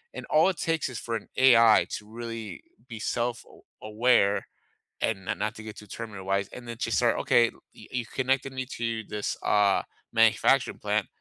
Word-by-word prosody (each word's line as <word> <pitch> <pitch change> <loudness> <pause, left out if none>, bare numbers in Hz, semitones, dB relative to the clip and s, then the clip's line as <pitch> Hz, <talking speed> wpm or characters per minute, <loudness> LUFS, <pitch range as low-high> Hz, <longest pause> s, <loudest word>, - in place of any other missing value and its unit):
and - - -6
all 155 +5 +5
it 185 - -3
takes 165 -4 -1
is 120 - -6
for 115 -1 -4
an 110 - -6
AI 115 -4 +6
to 105 - -5
really 115 -6 -7 0.3
be 115 - -7
self 120 +1 -2
aw - - -18 0.2
aware 110 -2 +2 0.5
and 95 -4 -1
not 105 - -3
not 105 +1 -2
to 110 - -10
get 110 -1 -9
too 105 - -11
Terminator 100 -3 -8
wise, 100 0 0
and 120 -1 -10
then 115 - -5
just 115 -3 0
start, 120 -2 +3
"Okay, 120 -1 +4
y - - -22
y - - -14
you 120 - -6
connected 135 +1 -1
me 130 -1 -4
to 115 -3 -3
this, 105 -1 -3
uh, 100 -1 +3 0.3
manufacturing - - +3
plant, - - 0
115 Hz, 200 wpm, -27 LUFS, 105-125 Hz, 0.5 s, AI